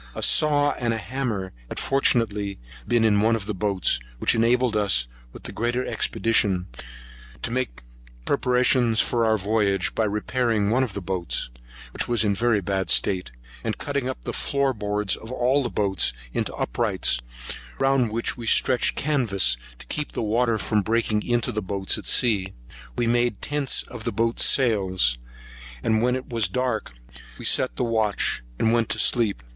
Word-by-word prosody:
A -, -, -4 dB
saw 145 Hz, -1 st, +4 dB
and 120 Hz, -2 st, 0 dB
hammer 110 Hz, -6 st, -3 dB, 0.2 s
had -, -, -7 dB
fortunately 105 Hz, -7 st, +1 dB, 0.3 s
been 120 Hz, -1 st, +2 dB
in 105 Hz, -2 st, +3 dB
one 115 Hz, +1 st, +3 dB
of 105 Hz, -3 st, -5 dB
the 105 Hz, -, -3 dB
boats, 95 Hz, -8 st, +1 dB, 0.2 s
which -, -, +2 dB
enabled 120 Hz, +1 st, +2 dB
us, 95 Hz, -, +3 dB, 0.2 s
with -, -, -13 dB
the -, -, -5 dB
greater 120 Hz, +3 st, -1 dB
expedition, 105 Hz, -5 st, +1 dB, 0.8 s
to -, -, -3 dB
make 120 Hz, -, -3 dB, 0.4 s
preparations 125 Hz, -2 st, +2 dB
for 115 Hz, +2 st, +1 dB
our 110 Hz, 0 st, +3 dB
voyage, 100 Hz, -2 st, 0 dB
by 110 Hz, -, 0 dB
repairing 105 Hz, 0 st, 0 dB
one 130 Hz, +3 st, +2 dB
of 115 Hz, -7 st, -4 dB
the 100 Hz, -, -5 dB
boats, 90 Hz, -8 st, -3 dB, 0.4 s
which -, -, -2 dB
was 120 Hz, -2 st, +3 dB
in 105 Hz, -, +2 dB
a -, -, +1 dB
very 110 Hz, 0 st, +1 dB
bad 95 Hz, -1 st, -2 dB
state, 90 Hz, -6 st, +2 dB, 0.3 s
and -, -, -2 dB
cutting 140 Hz, -3 st, -2 dB
up 130 Hz, -, -6 dB
the -, -, -4 dB
floor 140 Hz, -1 st, 0 dB
boards 105 Hz, -2 st, -1 dB
of 110 Hz, -, -11 dB
all 130 Hz, +3 st, +1 dB
the 120 Hz, -, -2 dB
boats 95 Hz, -, +1 dB, 0.2 s
into -, -, -2 dB
uprights, -, -, 0 dB, 0.6 s
round 135 Hz, -4 st, +2 dB
which 115 Hz, +1 st, -1 dB
we 120 Hz, -2 st, -7 dB
stretched 125 Hz, +2 st, +2 dB
canvas, 110 Hz, -, +2 dB, 0.2 s
to -, -, -12 dB
keep 150 Hz, -1 st, -4 dB
the -, -, -2 dB
water 115 Hz, +1 st, +1 dB
from 105 Hz, 0 st, 0 dB
breaking 110 Hz, 0 st, 0 dB
into 120 Hz, 0 st, 0 dB
the 105 Hz, -, -3 dB
boats 95 Hz, 0 st, 0 dB
at -, -, -9 dB
sea. 100 Hz, -6 st, +2 dB, 0.4 s
We 120 Hz, -, 0 dB
made 120 Hz, -2 st, +1 dB
tents 145 Hz, -2 st, 0 dB
of 120 Hz, -3 st, -10 dB
the 115 Hz, -, 0 dB
boats' 115 Hz, +2 st, +1 dB
sails; 95 Hz, -, +2 dB, 0.6 s
and 110 Hz, -1 st, +2 dB
when 125 Hz, +1 st, +2 dB
it 130 Hz, -, -5 dB
was 115 Hz, -4 st, 0 dB
dark, 115 Hz, -, -2 dB, 0.4 s
we -, -, -7 dB
set 130 Hz, -, +3 dB
the 125 Hz, -, -2 dB
watch, 110 Hz, -, +1 dB, 0.2 s
and 110 Hz, -, +2 dB
went 115 Hz, -2 st, +1 dB
to -, -, +2 dB
sleep. 105 Hz, -, +2 dB
115 Hz, 175 wpm, -24 LUFS, 100-125 Hz, 0.8 s, saw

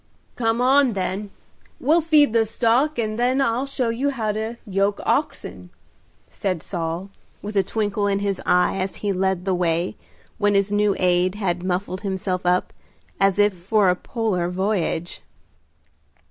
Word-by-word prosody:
"Come 230 Hz, 0 st, 0 dB
on, 265 Hz, -1 st, +4 dB
then; 195 Hz, +1 st, -3 dB, 0.5 s
we'll 315 Hz, +6 st, +3 dB
feed 300 Hz, -6 st, +4 dB
the 225 Hz, -1 st, +3 dB
stock, 245 Hz, +7 st, +1 dB
and 215 Hz, -1 st, -2 dB
then 250 Hz, +2 st, +2 dB
I'll 255 Hz, +1 st, +1 dB
show 260 Hz, -3 st, -1 dB
you 250 Hz, +5 st, 0 dB
how 225 Hz, -6 st, -1 dB
to 220 Hz, +2 st, -4 dB
yoke 200 Hz, 0 st, 0 dB
oxen," 90 Hz, 0 st, -2 dB, 0.6 s
said 185 Hz, -5 st, -3 dB
Saul, 170 Hz, +2 st, -4 dB, 0.3 s
with 210 Hz, +1 st, -6 dB
a 195 Hz, -, +5 dB
twinkle 205 Hz, 0 st, -1 dB
in 200 Hz, -1 st, +1 dB
his 200 Hz, -1 st, -2 dB
eye 180 Hz, +1 st, +2 dB
as 185 Hz, +1 st, -3 dB
he 200 Hz, -, +1 dB
led 190 Hz, -1 st, -1 dB
the 190 Hz, -, +1 dB
way, 175 Hz, 0 st, 0 dB, 0.4 s
when 205 Hz, -1 st, +2 dB
his 200 Hz, 0 st, +2 dB
new 205 Hz, -1 st, +2 dB
aide 180 Hz, +1 st, +2 dB
had 180 Hz, -4 st, -1 dB
muffled 185 Hz, +1 st, -2 dB
himself 190 Hz, -2 st, -2 dB
up 180 Hz, +1 st, +1 dB, 0.5 s
as 195 Hz, -1 st, +3 dB
if 205 Hz, 0 st, +4 dB
for 190 Hz, +2 st, +2 dB
a -, -, 0 dB
polar 190 Hz, -5 st, -2 dB
voyage. 180 Hz, -2 st, -2 dB
200 Hz, 160 wpm, -22 LUFS, 185-225 Hz, 0.6 s, a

